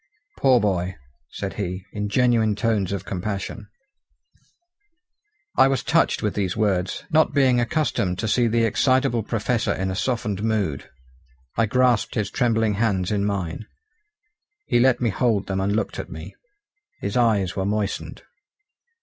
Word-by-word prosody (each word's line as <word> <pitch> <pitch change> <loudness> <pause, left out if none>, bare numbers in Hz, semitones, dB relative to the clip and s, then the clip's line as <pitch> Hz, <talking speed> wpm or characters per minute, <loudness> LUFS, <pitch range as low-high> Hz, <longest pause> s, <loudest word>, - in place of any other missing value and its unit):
"Poor 130 -3 +5
boy!" 95 -3 -1 0.3
said - - -5
he, 90 0 -4
in 105 -1 -3
genuine 115 -3 +2
tones 105 -3 0
of 95 -1 -4
compassion. 100 +2 -4 1.9
I - - +6
was 135 -1 0
touched 165 -5 +2
with 105 - 0
these 95 -2 -2
words, 95 -4 0
not 160 0 +3
being 130 -3 +4
accustomed 120 - 0
to 110 - -2
see 120 +3 +2
the 115 +1 +2
excitable 130 +2 +2
Professor 115 +2 -1
in 95 0 -2
a - - -3
softened 105 -3 -2
mood. 105 -10 -1 0.7
I 115 - +2
grasped 125 0 +2
his 105 -2 -1
trembling 115 -4 +1
hands 100 -4 0
in 100 -1 0
mine. 100 0 -3 1.0
He 120 - +2
let 130 0 +3
me 115 -3 +1
hold 105 -1 +1
them 95 -1 -2
and 100 +1 0
looked 110 - -2
at - - -6
me. - - -9 0.7
His 100 - -4
eyes 110 -7 +2
were 95 - -1
moistened. 105 -1 -3
105 Hz, 150 wpm, -23 LUFS, 100-120 Hz, 1.9 s, I